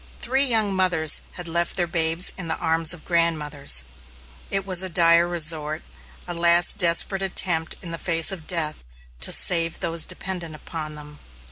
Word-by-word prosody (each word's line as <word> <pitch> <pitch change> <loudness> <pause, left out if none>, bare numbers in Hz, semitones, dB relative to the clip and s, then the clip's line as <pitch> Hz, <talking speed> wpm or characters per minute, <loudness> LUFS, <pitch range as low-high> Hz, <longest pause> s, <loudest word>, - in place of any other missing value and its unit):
Three 265 +3 -1
young 220 -5 0
mothers 170 -5 +3
had 175 -1 -6
left 170 +3 -3
their 175 - +1
babes 165 +1 0
in 180 -3 -7
the 160 - -2
arms 160 0 +2
of 180 -3 -3
grandmothers. 150 - +1 0.7
It 195 -1 -4
was 185 -2 -1
a 190 - -4
dire 170 0 +2
resort, 155 -2 0 0.4
a 175 - -4
last 170 +2 +2
desperate 175 +2 +2
attempt, 175 -3 +1
in 170 -1 -6
face 165 -1 +3
of 170 -5 -7
death, 160 -4 -1 0.4
to - - 0
save 165 -2 +4
those 165 -1 0
dependent 175 -4 -6
upon 155 0 -8
them. 150 0 -13
170 Hz, 160 wpm, -21 LUFS, 160-180 Hz, 0.7 s, save